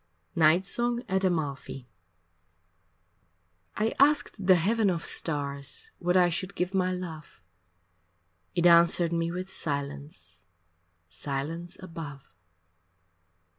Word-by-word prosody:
V -, -, -5 dB
Night 160 Hz, +4 st, +5 dB
Song 240 Hz, +4 st, -1 dB
at 190 Hz, +1 st, 0 dB
Amalfi 145 Hz, -7 st, -2 dB, 1.9 s
I 220 Hz, +1 st, 0 dB
asked 280 Hz, -9 st, +2 dB
the 185 Hz, -, +8 dB
heaven 210 Hz, +5 st, +2 dB
of 170 Hz, -2 st, -2 dB
stars 145 Hz, -, -2 dB
What 180 Hz, +1 st, +2 dB
I 180 Hz, -1 st, +5 dB
should 185 Hz, +3 st, -3 dB
give 180 Hz, +2 st, -2 dB
my 185 Hz, -1 st, +1 dB
love 170 Hz, -4 st, -7 dB, 1.2 s
It 175 Hz, -, +1 dB
answered 170 Hz, 0 st, +5 dB
me 165 Hz, 0 st, 0 dB
with 185 Hz, +2 st, -6 dB
silence, 140 Hz, -, -6 dB, 0.6 s
Silence 150 Hz, -, -5 dB
above. 160 Hz, -, -9 dB
170 Hz, 105 wpm, -28 LUFS, 145-185 Hz, 1.9 s, the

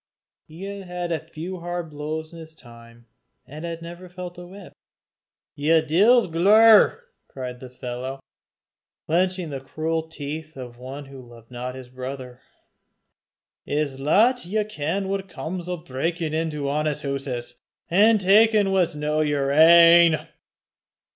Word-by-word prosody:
He 165 Hz, +4 st, -11 dB
had 180 Hz, -3 st, -5 dB
had 160 Hz, 0 st, -4 dB
few 175 Hz, +3 st, -6 dB
hard 175 Hz, -1 st, -5 dB
blows 155 Hz, +2 st, -5 dB
in 165 Hz, -, -10 dB
his 160 Hz, -1 st, -12 dB
time, 115 Hz, -2 st, -16 dB, 0.4 s
and 150 Hz, +4 st, -10 dB
had 165 Hz, 0 st, -6 dB
never 175 Hz, +2 st, -10 dB
felt 180 Hz, 0 st, -8 dB
a 175 Hz, -, -10 dB
whip. 195 Hz, +1 st, -13 dB, 0.8 s
"Ye 160 Hz, +3 st, +3 dB
deil's 200 Hz, +10 st, +4 dB
glaur!" 215 Hz, -, +5 dB, 0.2 s
cried 125 Hz, -2 st, -7 dB
the 130 Hz, -, -10 dB
fellow, 125 Hz, +2 st, -6 dB, 0.9 s
clenching 180 Hz, 0 st, 0 dB
the 135 Hz, -, -4 dB
cruel 160 Hz, +4 st, -3 dB
teeth 155 Hz, 0 st, -7 dB
of 120 Hz, -2 st, -9 dB
one 135 Hz, +3 st, -8 dB
who 135 Hz, -1 st, -11 dB
loved 120 Hz, -1 st, -16 dB
not 125 Hz, +1 st, -6 dB
his 130 Hz, -2 st, -10 dB
brother, 130 Hz, 0 st, -8 dB, 1.3 s
"I -, -, -4 dB
s' 145 Hz, -3 st, -1 dB
lat 220 Hz, -, +3 dB
ye 210 Hz, +5 st, -1 dB
ken 195 Hz, -1 st, -3 dB
what 195 Hz, 0 st, -3 dB
comes 170 Hz, +4 st, -6 dB
o' 180 Hz, -, -2 dB
brakin' 160 Hz, +3 st, -3 dB
into 155 Hz, -3 st, -2 dB
honest 150 Hz, +1 st, -1 dB
hooses, 130 Hz, -3 st, -4 dB, 0.3 s
an' 215 Hz, +5 st, +5 dB
takin' 210 Hz, +1 st, +4 dB
what's 180 Hz, -5 st, +1 dB
no 150 Hz, +1 st, -1 dB
yer 145 Hz, -2 st, 0 dB
ain!" 170 Hz, +2 st, +7 dB
160 Hz, 140 wpm, -23 LUFS, 135-180 Hz, 1.3 s, ain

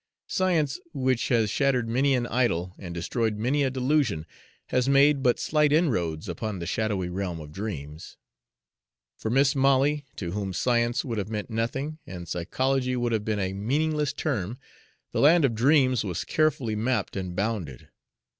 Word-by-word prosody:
Science, 165 Hz, -7 st, 0 dB, 0.2 s
which 130 Hz, -3 st, +1 dB
has 115 Hz, -5 st, +2 dB
shattered 130 Hz, -4 st, +1 dB
many 135 Hz, +4 st, +2 dB
an 120 Hz, -1 st, 0 dB
idol 95 Hz, -8 st, 0 dB
and 90 Hz, -3 st, -7 dB
destroyed 105 Hz, +6 st, -1 dB
many 130 Hz, +7 st, +1 dB
a 135 Hz, -, +2 dB
delusion, 130 Hz, -, 0 dB, 0.4 s
has 125 Hz, +1 st, +1 dB
made 140 Hz, +1 st, +5 dB
but 125 Hz, -2 st, +2 dB
slight 150 Hz, -1 st, +2 dB
inroads 90 Hz, -, +1 dB
upon 110 Hz, -3 st, -4 dB
the 85 Hz, -, -5 dB
shadowy 100 Hz, -1 st, -1 dB
realm 90 Hz, -2 st, -3 dB
of 75 Hz, -1 st, -9 dB
dreams. 75 Hz, -5 st, -7 dB, 1.0 s
For 110 Hz, -, -4 dB
Mis' 135 Hz, +4 st, +3 dB
Molly, 140 Hz, +2 st, +3 dB
to 85 Hz, -4 st, -4 dB
whom 100 Hz, -1 st, -3 dB
science 120 Hz, +5 st, +1 dB
would 115 Hz, -5 st, -2 dB
have 100 Hz, -, -4 dB
meant 105 Hz, +1 st, -4 dB
nothing 135 Hz, +7 st, -2 dB
and 90 Hz, -6 st, -7 dB
psychology 130 Hz, +10 st, -1 dB
would 120 Hz, -1 st, -1 dB
have 110 Hz, -2 st, 0 dB
been 110 Hz, 0 st, -1 dB
a 95 Hz, -1 st, -1 dB
meaningless 150 Hz, +8 st, 0 dB
term, 120 Hz, -, -2 dB, 0.5 s
the -, -, -1 dB
land 155 Hz, +2 st, +6 dB
of 125 Hz, -, +1 dB
dreams 130 Hz, +1 st, +3 dB
was 90 Hz, -5 st, -3 dB
carefully 135 Hz, -8 st, +1 dB
mapped 125 Hz, +4 st, -1 dB
and 90 Hz, -2 st, -4 dB
bounded. 100 Hz, -, -3 dB
120 Hz, 165 wpm, -26 LUFS, 100-135 Hz, 1.0 s, land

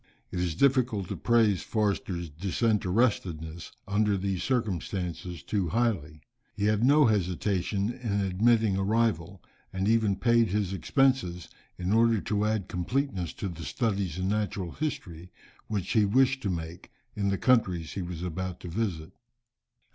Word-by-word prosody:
It 90 Hz, -, -3 dB
is 90 Hz, -3 st, -1 dB
difficult 125 Hz, -5 st, +2 dB
to -, -, -3 dB
praise 115 Hz, -5 st, +3 dB
Forster's 100 Hz, -5 st, -1 dB
disinterestedness 90 Hz, -, 0 dB, 0.2 s
under 105 Hz, 0 st, +2 dB
these 95 Hz, -1 st, -2 dB
circumstances 90 Hz, -, -2 dB
too 95 Hz, +4 st, -1 dB
highly. 85 Hz, -10 st, -1 dB, 0.3 s
He 105 Hz, -1 st, -1 dB
had 105 Hz, +1 st, +2 dB
no 145 Hz, +3 st, +6 dB
hesitation 100 Hz, 0 st, 0 dB
in 110 Hz, -5 st, -2 dB
admitting 105 Hz, +2 st, +2 dB
a 95 Hz, -, 0 dB
rival, 100 Hz, -4 st, 0 dB, 0.3 s
and 95 Hz, +1 st, -1 dB
even 110 Hz, -3 st, +3 dB
paid 115 Hz, +2 st, +3 dB
his 100 Hz, -1 st, -1 dB
expenses, 95 Hz, -, +1 dB, 0.3 s
in 90 Hz, +2 st, -1 dB
order 115 Hz, -1 st, +4 dB
to 105 Hz, +1 st, -1 dB
add 105 Hz, -3 st, 0 dB
completeness 95 Hz, -, -2 dB
to 100 Hz, -, -4 dB
the 85 Hz, -3 st, -7 dB
studies 100 Hz, -, -1 dB
in 95 Hz, 0 st, -1 dB
natural 100 Hz, -3 st, -1 dB
history 90 Hz, -, -5 dB, 0.4 s
which 105 Hz, -4 st, -3 dB
he 110 Hz, -, +4 dB
wished 130 Hz, +6 st, +3 dB
to 100 Hz, -, -2 dB
make 85 Hz, -1 st, -5 dB, 0.2 s
in 100 Hz, -1 st, 0 dB
the 100 Hz, -, 0 dB
countries 95 Hz, -11 st, +2 dB
he 100 Hz, -, -3 dB
was 85 Hz, -1 st, -5 dB
about 90 Hz, +1 st, -4 dB
to 90 Hz, -, -7 dB
visit. 90 Hz, -4 st, -3 dB
100 Hz, 145 wpm, -28 LUFS, 90-110 Hz, 0.4 s, no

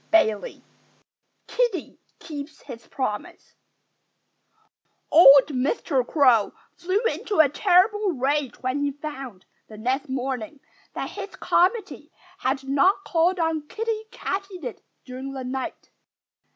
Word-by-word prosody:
XIV 220 Hz, -11 st, +1 dB, 0.8 s
KIDDIE 475 Hz, -10 st, -2 dB, 0.2 s
KEEPS 295 Hz, -1 st, -9 dB
HIS 235 Hz, -4 st, -10 dB
PROMISE 235 Hz, -7 st, -5 dB, 1.6 s
Old 280 Hz, -3 st, +8 dB
Mr. 270 Hz, -, 0 dB
Crow 255 Hz, -9 st, +3 dB, 0.2 s
flew 370 Hz, +4 st, -1 dB
into 455 Hz, -3 st, -2 dB
a 315 Hz, -, +8 dB
terrible 385 Hz, -, +3 dB
rage 275 Hz, 0 st, -1 dB
when 255 Hz, +2 st, -1 dB
he 285 Hz, -, +1 dB
found, 270 Hz, -9 st, -8 dB, 0.2 s
the 215 Hz, -, -12 dB
next 260 Hz, +6 st, -2 dB
morning, 260 Hz, 0 st, -4 dB, 0.4 s
that -, -, -4 dB
his 400 Hz, 0 st, -8 dB
committee 405 Hz, +5 st, 0 dB, 0.3 s
had 265 Hz, +1 st, -1 dB
not 365 Hz, +9 st, +3 dB
called 350 Hz, +2 st, +2 dB
on 320 Hz, -3 st, -1 dB
Kiddie 440 Hz, +2 st, -3 dB
Katydid 390 Hz, -, -5 dB, 0.2 s
during 260 Hz, +1 st, -7 dB
the 265 Hz, -1 st, -5 dB
night. 260 Hz, +1 st, -5 dB
290 Hz, 110 wpm, -24 LUFS, 260-370 Hz, 1.6 s, Old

